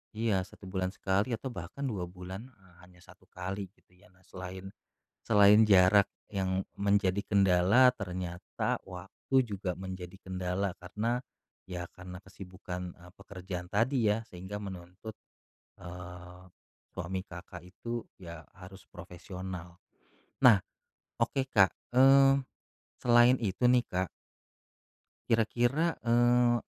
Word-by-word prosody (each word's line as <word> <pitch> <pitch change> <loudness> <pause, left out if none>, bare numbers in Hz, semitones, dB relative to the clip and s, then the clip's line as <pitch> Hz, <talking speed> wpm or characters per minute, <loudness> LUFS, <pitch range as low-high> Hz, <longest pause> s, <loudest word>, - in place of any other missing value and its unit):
Iya 110 -4 +1
1 - - -18
bulan 95 -1 -1
sekali 100 +5 0
atau 130 +3 -6
bahkan 90 +8 -7
2 100 -9 -2
bulan, 95 +5 -9
eee, 95 -8 -23
hanya 90 0 -18
1 - - -19
kali, 95 +2 -5
gitu - - -34
ya. 105 - -21
Nah, 95 -2 -27
selain 95 +1 -8 0.5
selain 105 0 +6
jarak 95 +1 +6 0.2
yang 95 -1 -1
menjadi 100 -1 +1
kendala 100 +6 +5
ternyata 90 -4 -4
waktu 90 +8 -9
juga 100 -4 -4
menjadi 95 -1 -7
kendala 95 +1 -2
karena 110 +7 -2 0.5
ya 90 -1 -4
karena 90 0 -10
kesibukan, 90 -1 -8
e 85 - -19
pekerjaan 90 -2 -8
tadi 115 +3 +1
ya 115 +2 -1
sehingga 95 +2 -8
menuntut, 95 +2 -8 0.6
eee, 90 0 -10 0.5
suami 95 +3 -4
Kakak 90 -1 -10
itu, 115 +6 -6 0.2
ya 85 -3 -9
harus 95 0 -12
profesional. 90 0 -8 0.7
Nah, 115 -5 +9 0.6
oke 130 +3 0
Kak, 95 -3 +5 0.2
eee, 135 +1 +6 0.6
selain 120 +1 +6
itu 100 0 -2
nih 125 -1 +4
Kak 90 0 -2 1.2
kira-kira, 120 +8 +1
eee, 120 0 +4
95 Hz, 120 wpm, -30 LUFS, 90-115 Hz, 1.2 s, Nah